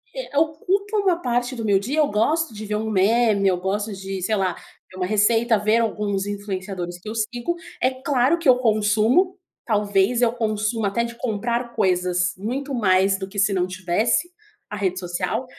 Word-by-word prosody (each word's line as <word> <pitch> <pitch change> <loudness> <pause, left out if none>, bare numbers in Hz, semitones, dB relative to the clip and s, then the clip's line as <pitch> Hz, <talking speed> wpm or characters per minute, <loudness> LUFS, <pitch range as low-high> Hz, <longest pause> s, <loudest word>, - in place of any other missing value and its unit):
eh, - - -5
ocupa 370 +7 0
uma 375 -4 +2
parte 245 -2 -1
do 225 -2 -4
meu 200 -2 +3
dia, 250 +10 -3
eu 295 - +3
gosto 290 +7 0
de 215 0 -7
ver 210 - -1
um 220 +1 -2
meme, 210 0 +3
eu 185 -2 +2
gosto 205 +4 -2
de, 195 0 -5
sei 215 +4 0
lá, 190 -3 0 0.3
ver 185 - -14
uma 180 -1 -1
receita, 225 +3 +3
ver 215 +2 +2
alguns 205 -3 -1
influenciadores 190 -3 -5
que 210 - -9
eu 220 - -5
sigo. 240 +9 -2 0.3
É 255 - +4
claro 265 +3 +1
que 335 -3 -3
eu 250 - +7
consumo, 225 - +2 0.3
talvez 210 +1 +1
eu 235 -2 +4
consuma 215 -1 -1
até 235 +4 0
de 235 0 -6
comprar 235 +1 -2
coisas, 180 -1 +1
muito 265 +8 -4
mais 195 -4 +3
do 190 - -5
que 200 +1 -11
se 205 +1 +3
não 180 -1 +1
tivesse 185 - 0 0.4
a - - -5
rede 190 -2 -1
social. 180 +7 -3
215 Hz, 190 wpm, -22 LUFS, 195-245 Hz, 0.4 s, eu